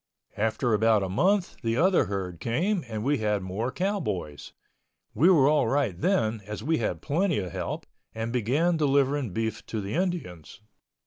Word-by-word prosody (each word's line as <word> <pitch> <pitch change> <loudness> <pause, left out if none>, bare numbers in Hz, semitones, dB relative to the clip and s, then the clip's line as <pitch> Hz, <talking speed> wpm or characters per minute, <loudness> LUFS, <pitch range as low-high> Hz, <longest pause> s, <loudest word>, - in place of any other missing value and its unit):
After 110 +3 0
about 110 -1 +3
a 95 - -3
month 185 - +1
the 115 -1 -1
other 180 -3 +4
herd 95 -4 -4
came 170 - 0
and 110 -2 -4
we 140 +3 +1
had 105 -2 0
more 105 +7 -3
cowboys. 155 - -3 0.6
We 165 +6 +4
were 150 -8 +5
all 145 -5 +3
right 135 -6 +1
then 110 - 0
as 105 0 -6
we 160 +4 +1
had - - -2
plenty 170 +4 +1
of 95 -4 -3
help, - - -4 0.3
and 115 +1 -3
began 140 +9 +1
delivering 140 -3 +2
beef 110 +2 -3
to 110 - -3
the 100 0 -5
Indians. 165 - -3
120 Hz, 170 wpm, -27 LUFS, 105-160 Hz, 0.6 s, were